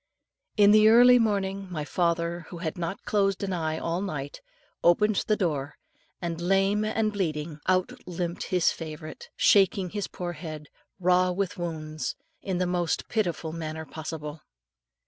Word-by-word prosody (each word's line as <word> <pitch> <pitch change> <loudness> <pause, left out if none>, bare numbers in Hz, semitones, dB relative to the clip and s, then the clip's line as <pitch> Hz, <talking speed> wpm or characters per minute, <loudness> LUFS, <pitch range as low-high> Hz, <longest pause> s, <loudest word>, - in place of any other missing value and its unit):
Early 210 - +5
in 200 - +8
the 230 +4 +7
morning, 195 -3 0
my 155 -4 -3
father, 170 0 -1
who 175 - -8
had 165 -2 -3
not 175 +2 -4
closed 195 -1 +1
an 195 -1 -1
eye 160 -2 -1
all 170 +3 -2
the 200 - -2
night, 145 -5 -5 0.4
opened 210 +4 +4
the 215 - +3
door, 150 -8 -2 0.4
and, 170 -1 -4
lame 195 +3 +2
and 215 0 0
bleeding, 155 -5 -2
out 185 0 +2 0.2
limped 175 -1 -3
his 180 -2 +2
old - - -8
favourite, 155 -1 -8
shaking 195 -2 +4
his 205 -2 -3
poor 175 -1 -5
head 155 -2 -8 0.3
raw 180 0 +3
with 180 0 -2
wounds 155 -5 -4 0.3
in 190 -2 -2
the 180 - +1
most 175 -2 -1
pitiful 175 -7 -1
manner 160 -1 -5
possible. 155 -1 -7
175 Hz, 160 wpm, -27 LUFS, 160-195 Hz, 0.4 s, in